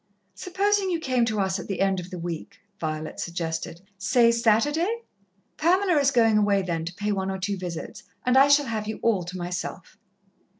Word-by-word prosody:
"Supposing 395 +2 0
you 340 -2 0
came 255 -6 +1
to 220 -2 -1
us 190 0 0
at - - -8
the 195 - -3
end 195 -1 +2
of 180 0 -8
the 185 - -7
week?" 170 +3 -6 0.2
Violet 155 -1 -4
suggested. 165 0 -4 0.2
"Say 235 +3 +4
Saturday. 295 - +1 0.5
Pamela 365 +3 +3
is 280 -1 +4
going 225 -5 +4
away 200 -2 +2
then 165 -3 -2
to 170 - -5
pay 210 +1 -2
one 190 -1 -1
or 190 - -2
two 200 +2 -2
visits 180 -3 -6 0.2
and 250 0 +3
I 270 +1 +7
shall 285 0 +5
have 220 -3 -3
you 220 - -4
all 220 -5 +2
to 180 +2 -7
myself." 175 0 -5
210 Hz, 195 wpm, -25 LUFS, 180-265 Hz, 0.5 s, I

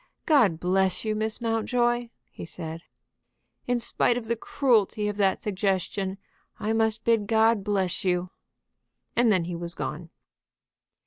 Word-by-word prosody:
"God 230 - +4
bless 190 +3 +1
you, 215 - 0
Miss 215 +2 -2
Mountjoy!" 240 +1 0 0.2
he - - -9
said. 165 -1 -7 0.9
"In 245 0 +2
spite 235 0 +1
of 240 - -5
the 235 +1 0
cruelty 220 -4 +1
of 210 - -2
that 195 -2 +1
suggestion, 195 -1 -1 0.4
I 215 +1 -1
must 220 0 +1
bid 225 -3 +2
God 225 -1 +3
bless 195 -2 -1
you." 180 -1 0 0.8
And 235 -2 +4
then 185 -4 +2
he 175 +1 -4
was 170 0 -3
gone. 165 +2 -5
210 Hz, 140 wpm, -26 LUFS, 185-230 Hz, 0.9 s, God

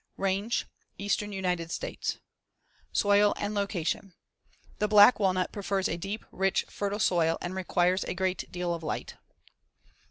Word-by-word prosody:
Range: 195 +4 0 0.3
Eastern 205 +1 -1
United 180 -4 -2
States. - - -3 0.7
Soil 205 0 +4
and 205 +1 -2
location: 195 -2 -2 0.6
The 210 - +2
black 210 +3 +7
walnut 185 -2 +1
prefers 195 -1 -1
a - - -2
deep, 195 +5 -5
rich, 190 0 +1
fertile 205 0 -2
soil 170 -5 +2
and 175 - -4
requires 185 0 +1
a - - -3
great 185 0 -2
deal 175 -1 -2
of 170 - -5
light. 160 - -4
190 Hz, 135 wpm, -29 LUFS, 180-205 Hz, 0.7 s, black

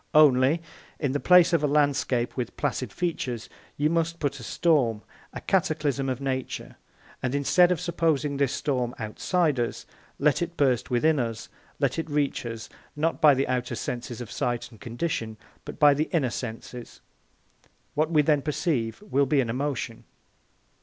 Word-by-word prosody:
Only, 150 +1 +5 0.4
in 140 -4 0
the 145 - -1
place 180 +1 +6
of 165 -3 +3
a - - +3
landscape 140 -4 +1
with 125 -3 -4
placid 130 -5 -2
features 130 - -3 0.3
you 145 - +2
must 165 +1 0
put 140 -2 -2
a - - -9
storm, 120 - +1 0.3
a - - -6
cataclysm 150 -7 0
of 130 -1 -2
nature; 130 -2 -4 0.5
and, 130 +1 -1
instead 175 +6 +4
of 180 - +1
supposing 160 -4 0
this 140 -2 +1
storm 125 -5 -1
outside 145 - 0
us, 120 - -2 0.3
let 150 +3 +2
it 170 0 -3
burst 130 -5 +2
within 145 +5 +2
us, 115 -3 -3 0.3
let - - 0
it 160 - -4
reach 145 -4 -1
us, 115 -1 -6 0.3
not 160 +3 -1
by 150 -3 +7
the 135 - 0
outer 125 -1 -1
senses 120 0 -5
of 115 - -8
sight 120 0 -2
and 110 - -17
condition, 115 -3 -3 0.3
but - - -8
by 145 -2 +6
the 150 +3 0
inner 140 -8 +1
senses. 120 0 -7 0.9
What 155 +1 +1
we 155 -3 +4
then 150 -1 +3
perceive 145 - -2
will 140 -9 +1
be 140 +1 +2
an 120 -4 +1
emotion. 130 -3 -3
140 Hz, 165 wpm, -26 LUFS, 125-155 Hz, 0.9 s, by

